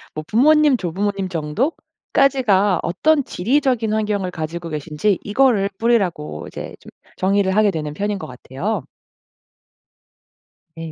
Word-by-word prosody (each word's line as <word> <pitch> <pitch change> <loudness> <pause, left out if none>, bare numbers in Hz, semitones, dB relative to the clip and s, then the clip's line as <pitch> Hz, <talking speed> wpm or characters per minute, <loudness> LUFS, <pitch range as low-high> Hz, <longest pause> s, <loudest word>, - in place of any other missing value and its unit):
뭐 155 - -4
부모님, 300 +4 +4
조부모님 195 +1 -2
정도까지가 205 - 0
어떤 290 - +2
지리적인 240 0 0
환경을 210 -3 -1
가지고 165 +1 -5
계신지 155 +6 -1
이거를 210 -3 +2
뿌리라고 190 - 0
이제 - - -8
좀 - - -13 0.3
정의를 190 0 +1
하게 215 -1 +4
되는 150 -4 -4
편인 205 +4 -2
것 - - -7
같아요. 130 - -4 1.9
네. 165 -1 -6
200 Hz, 285 characters per minute, -20 LUFS, 170-230 Hz, 1.9 s, 부모님